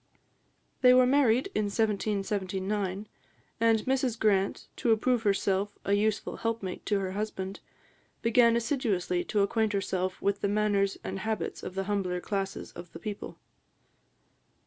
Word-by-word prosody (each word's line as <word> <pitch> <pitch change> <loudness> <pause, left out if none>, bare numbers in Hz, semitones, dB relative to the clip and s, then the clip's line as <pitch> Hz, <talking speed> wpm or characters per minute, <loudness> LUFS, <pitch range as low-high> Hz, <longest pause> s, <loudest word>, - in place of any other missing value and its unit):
They 250 0 +7
were 255 0 +6
married 260 - +3
in 215 - +1
1779, 200 -1 -1 0.5
and 225 -1 +4
Mrs 260 -2 0
Grant, 200 -3 +1
to 235 - +1
approve 235 +2 +2
herself 200 -1 0
a 200 - +1
useful 210 +1 0
helpmate 225 -5 -3
to 205 - +2
her 190 -1 -2
husband, 195 -1 -4 0.6
began 235 0 +5
assiduously 225 -8 0
to 210 - +1
acquaint 220 +1 +1
herself 185 -2 -1
with 200 0 0
the - - +1
manners 205 -1 +1
and 195 - -4
habits 215 -4 -3
of 185 - -7
the 195 - -1
humbler 190 -3 -1
classes 195 +1 -3
of 175 - -11
the 165 - -8
people. 205 +2 -6
205 Hz, 140 wpm, -29 LUFS, 195-225 Hz, 0.6 s, They